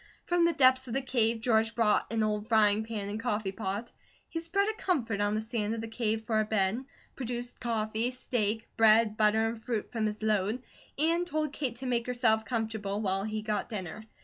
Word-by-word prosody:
From 350 -1 +3
the 340 - +3
depths 260 -2 +4
of 230 - -4
the 270 - +1
cave 230 -3 +1
George 225 -2 +2
brought 220 -2 +2
an 225 -1 +1
old 210 0 -1
frying 215 -2 +4
pan 220 -3 -4
and 210 +2 -4
coffee 215 -4 -1
pot. 205 +3 -4 0.4
He 330 - -4
spread 395 +5 0
a 435 - 0
comfort 245 - -1
on 205 +1 +1
the 215 - 0
sand 225 -1 -2
of 225 - -4
the 225 - -5
cave 225 -1 -1
for 220 -2 +1
a - - +3
bed, 215 +3 0 0.3
produced 245 -1 -4
coffee, 225 0 -1
steak, 230 -3 -1
bread, 220 -1 +5
butter, 220 +1 +3
and 225 0 -6
fruit 225 -3 -3
from 225 -3 0
his 215 0 -5
load, 215 +3 +1 0.3
and 335 +4 +1
told 310 -3 -1
Kate 260 -6 -2
to 255 +2 -5
make 240 -1 0
herself 220 -3 +2
comfortable 220 -4 -2
while 195 -1 0
he 215 0 -3
got 210 0 -2
dinner. 210 -1 -6
225 Hz, 205 wpm, -30 LUFS, 215-245 Hz, 0.4 s, bread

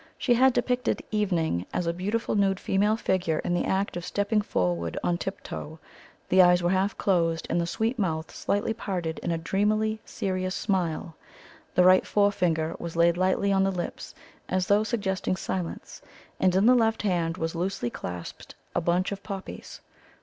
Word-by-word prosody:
She 245 - +2
had 260 +2 +5
depicted 250 0 0
"Evening" 170 - 0
as 180 - -1
a 170 - 0
beautiful 205 +6 -2
nude 195 -2 +2
female 210 +3 +1
figure 180 -7 0
in 175 - -2
the 175 - 0
act 195 +1 0
of 175 - -4
stepping 205 +3 0
forward 85 - -1
on 175 0 0
tip 195 - -5
toe; 155 +2 -7 0.5
the 185 +1 +6
eyes 180 0 +5
were 175 - +2
half 190 +2 +1
closed, 165 -4 +1
and 175 - +2
the 170 - -2
sweet 225 +7 -1
mouth 160 -5 -2
slightly 205 +2 -1
parted 180 -7 -3
in - - -4
a 165 - 0
dreamily 215 +5 0
serious 185 -1 -3
smile. 170 -5 -1 0.6
The 180 - +5
right 185 +1 +6
forefinger 180 -6 +1
was 170 -1 -6
laid 170 0 +4
lightly 185 +2 +1
on 195 0 +3
the 195 - +2
lips, 180 -2 -5 0.3
as 185 0 +1
though 205 +3 +3
suggesting 195 -5 -1
silence; 185 -2 -5 0.4
and 185 -1 +3
in 195 +2 +4
the 250 - +7
left 225 -3 +2
hand 175 -4 0
was 165 -2 -2
loosely 180 -7 -2
clasped 90 -1 -7 0.2
a - - 0
bunch 175 +3 +1
of 200 -1 -5
poppies. 195 -2 -8
185 Hz, 180 wpm, -27 LUFS, 170-205 Hz, 0.6 s, the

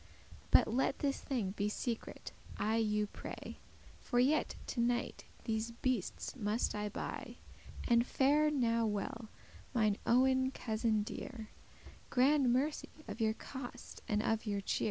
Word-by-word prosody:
But - - +6
let 255 +4 +1
this 280 -1 0
thing 235 -9 -1
be 205 +1 -1
secret, 230 +2 -4 0.3
I 220 +2 +1
you 210 -2 +2
pray; 205 - -8 0.4
For 245 - -2
yet 280 +5 +3
to 245 - -4
night 240 0 0 0.2
these 220 0 -1
beastes 235 -2 -2
must 215 -1 0
I 210 0 -2
buy. - - -5 0.5
And 235 0 +5
fare 290 +4 +3
now 230 -5 +2
well, 215 +2 -3 0.5
mine 215 -3 +3
owen 260 +1 +4
cousin 220 -3 0
dear; 220 +1 -7 0.6
*Grand 265 0 +4
mercy* 280 +5 0 0.2
of 230 - -5
your 220 0 +2
cost 250 -1 -8
and 210 -1 +1
of 225 0 0
your 200 -1 0
cheer." - - -1
235 Hz, 140 wpm, -35 LUFS, 215-260 Hz, 0.6 s, But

